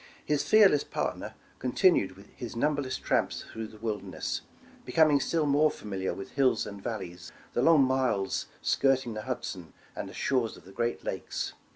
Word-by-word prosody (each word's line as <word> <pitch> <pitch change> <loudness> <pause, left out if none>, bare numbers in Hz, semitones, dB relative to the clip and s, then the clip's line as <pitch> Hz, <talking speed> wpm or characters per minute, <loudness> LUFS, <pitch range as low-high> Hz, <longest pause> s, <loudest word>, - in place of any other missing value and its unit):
His 150 -1 +1
fearless 200 -9 +6
partner - - -3 0.2
continued 125 - +3 0.2
his 120 -2 -7
numberless 140 +1 0
tramps - - 0
through 110 0 -4
the 110 - -14
wilderness, 105 -2 -3 0.4
becoming 150 +2 +4
still 160 +3 +1
more 145 +2 +4
familiar 95 -6 -4
with 95 0 -7
hills 135 -2 +2
and 100 -1 -8
valleys, 90 -6 -6 0.2
the - - +1
long 160 -4 +6
miles 130 -7 0 0.2
skirting 130 -3 +2
the 110 - -4
Hud 130 +2 -3
son, 90 -5 -7 0.2
and - - -5
the - - -11
shores 125 -5 0
of - - -17
the 95 - -13
great 120 +4 -2
Lakes. - - -3
125 Hz, 165 wpm, -29 LUFS, 105-145 Hz, 0.4 s, fearless